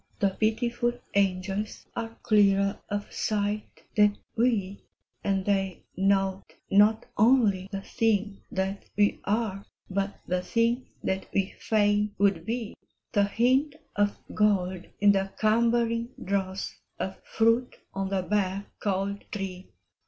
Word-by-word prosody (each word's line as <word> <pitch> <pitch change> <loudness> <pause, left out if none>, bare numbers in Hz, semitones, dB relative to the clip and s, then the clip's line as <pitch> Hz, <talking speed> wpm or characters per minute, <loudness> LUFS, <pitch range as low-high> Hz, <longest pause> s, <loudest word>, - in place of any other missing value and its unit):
the 200 -2 +3
pitiful 235 +4 0 0.2
angels 195 +1 0
Are 225 -1 -5
clearer 200 -2 +4
of 205 0 -4
sight 210 0 -2
than 210 -1 +4 0.2
we, 215 -5 +1 0.4
And 195 -1 0
they 195 -2 0
note 195 0 +1 0.2
not 210 +3 +5
only 210 -5 +4
the 195 -1 -4
thing 210 -3 0
that 195 +1 -2 0.2
we 205 0 +3
are, 205 -2 -1 0.3
But 195 +1 -2
the 180 0 0
thing 230 +5 +1 0.2
that 190 0 -1
we 195 0 +1
fain 205 -1 +2
would 195 -5 +2
be, 230 -1 -2 0.4
The 205 -3 +3
hint 260 +8 +2 0.2
of 205 0 +1 0.2
gold 190 -4 +1
in 205 0 +6
the 195 -1 +1
cumbering 230 +1 +2
dross, 190 0 -2 0.2
Of 190 - -5
fruit 230 +2 +2 0.2
on 195 0 -2
the 195 -1 0
bare, 200 0 0
cold 200 0 -1
tree. 190 -2 -5
205 Hz, 125 wpm, -28 LUFS, 195-220 Hz, 0.4 s, in